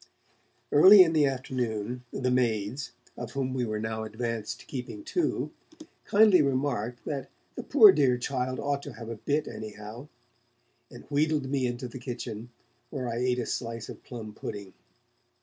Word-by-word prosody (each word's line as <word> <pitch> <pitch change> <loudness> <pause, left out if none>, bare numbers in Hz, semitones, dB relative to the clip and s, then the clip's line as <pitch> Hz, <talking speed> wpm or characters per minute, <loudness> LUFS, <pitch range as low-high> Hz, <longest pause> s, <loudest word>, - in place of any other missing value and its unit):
Early 185 +7 +9
in 165 -2 0
the 150 -3 +4
afternoon, 125 -3 -3
the 125 -1 -1
maids, 120 +1 0 0.2
of 120 -1 -7
whom 130 -1 -2
we 125 -2 -1
were 110 -1 -3
now 110 0 -3
advanced 115 0 -4
to - - -16
keeping 135 - -6
two, 340 +2 -1 0.5
kindly 205 -4 +6
remarked 130 -4 -1
that 140 -3 -4 0.2
'the - - -5
poor 225 -8 +8
dear 135 -7 +3
child 130 0 -2
ought 140 0 -1
to - - -8
have 115 -1 -9
a 115 - -4
bit, 145 +7 -1
anyhow', 110 +4 -8 0.8
and - - -12
wheedled 145 -2 +1
me 135 -3 +1
into 120 +1 -4
the 125 +2 -9
kitchen, 120 -2 -6 0.4
where 130 -4 -4
I 115 0 -3
ate 125 0 +1
a 120 - -2
slice 115 -1 -4
of - - -9
plum 110 -4 -8
pudding. 100 -2 -7
125 Hz, 165 wpm, -28 LUFS, 115-140 Hz, 0.8 s, Early